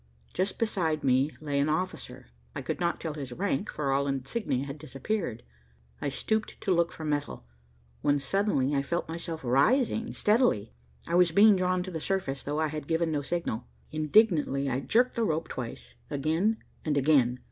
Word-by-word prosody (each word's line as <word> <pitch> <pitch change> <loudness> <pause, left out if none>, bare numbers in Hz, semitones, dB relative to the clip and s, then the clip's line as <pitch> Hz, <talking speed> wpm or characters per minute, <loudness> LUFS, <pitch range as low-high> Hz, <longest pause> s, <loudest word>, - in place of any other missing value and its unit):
Just 185 +2 -1
beside 170 -9 0
me 130 +2 +3
lay 145 -2 -1
an 145 +2 +2
officer. 155 - -3 0.2
I - - -4
could - - -3
not 175 -1 0
tell 160 -2 -4
his 140 -4 -6
rank, 195 +5 -1
for 140 -3 -2
all 140 +1 +1
insignia 135 - -2
had 140 +1 -7
disappeared. 135 - -3 0.6
I - - 0
stooped 220 +9 -2
to 190 - +2
look 170 0 +2
for 160 - -7
metal, 145 - -2 0.6
when 145 0 +3
suddenly 145 -2 +1
I 140 - +2
felt 170 +5 -2
myself 165 -1 -5
rising 225 - +2
steadily. 210 - +2 0.3
I 170 - -3
was 175 0 +5
being 205 +5 +6
drawn 185 -1 +1
to 185 - -7
the 160 - -3
surface, 185 -9 -1
though 145 +2 -2
I 155 -1 +1
had 150 -1 -5
given 165 0 +1
no 145 -2 0
signal. 145 -7 -3 0.2
Indignantly 155 -3 +3
I 130 - 0
jerked 245 - +2
the 235 - +1
rope 160 -5 -1
twice 65 - -6 0.2
again 160 +10 +1 0.3
and 150 -2 0
again. 130 -4 +3
155 Hz, 180 wpm, -29 LUFS, 140-185 Hz, 0.6 s, being